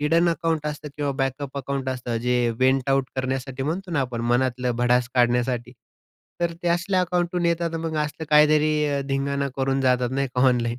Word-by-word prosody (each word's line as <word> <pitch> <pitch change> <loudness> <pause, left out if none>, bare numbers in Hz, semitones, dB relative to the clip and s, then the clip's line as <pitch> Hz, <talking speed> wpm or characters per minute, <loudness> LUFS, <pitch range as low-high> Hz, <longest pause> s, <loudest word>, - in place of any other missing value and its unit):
Hidden 165 +4 +3
account 165 -2 -1
असतं 150 0 -5
किंवा 145 -1 -1
backup 135 +1 -3
account 135 0 -3
असतं, 125 -2 -3
जे 125 0 +1
वेन्ट 130 +1 +2
आऊट 135 -1 +2
करण्यासाठी 130 0 -3
म्हणतो 175 +6 -3
ना 150 - +1
आपण, 125 -3 -3
मनातलं 125 0 +1
भडास 120 0 +2
काढण्यासाठी. 125 0 +1 0.7
तर 170 -1 0
ते 175 - 0
असल्या 175 +2 +1
अकाउंटहून 175 -1 0
येतात 170 0 0
मग 160 -1 -3
असला 155 +2 -6
काहीतरी 150 -1 +4
धिंगाणा 140 0 -1
करून 135 0 0
जातात, 125 -1 +2
नाही 135 0 0
का, 125 - +1
ऑनलाईन. 120 -1 0
135 Hz, 175 wpm, -24 LUFS, 125-155 Hz, 0.7 s, काहीतरी